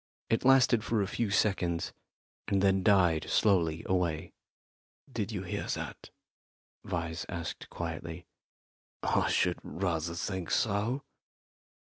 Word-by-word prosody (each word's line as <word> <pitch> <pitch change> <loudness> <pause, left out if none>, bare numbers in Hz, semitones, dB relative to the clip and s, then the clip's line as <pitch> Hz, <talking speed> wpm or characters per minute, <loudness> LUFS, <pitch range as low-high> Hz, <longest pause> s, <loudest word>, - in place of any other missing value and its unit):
It 115 - +2
lasted 130 -4 +5
for 115 -3 +1
a - - -2
few 110 +1 -1
seconds, 95 -4 +1 0.5
and 100 - +2
then 95 -1 +4
died 90 -5 +3
slowly 85 -6 +3
away. 85 -4 0 0.8
"Did 110 -3 -2
you 100 -4 -3
hear 85 - -3
that?" - - -7 0.7
Vyse 85 -1 -3
asked 85 -1 -5
quietly. 85 0 -5 0.8
"I - - +2
should - - +2
rather 85 -2 -2
think 95 0 -3
so." 110 +6 +1
95 Hz, 115 wpm, -31 LUFS, 85-105 Hz, 0.8 s, lasted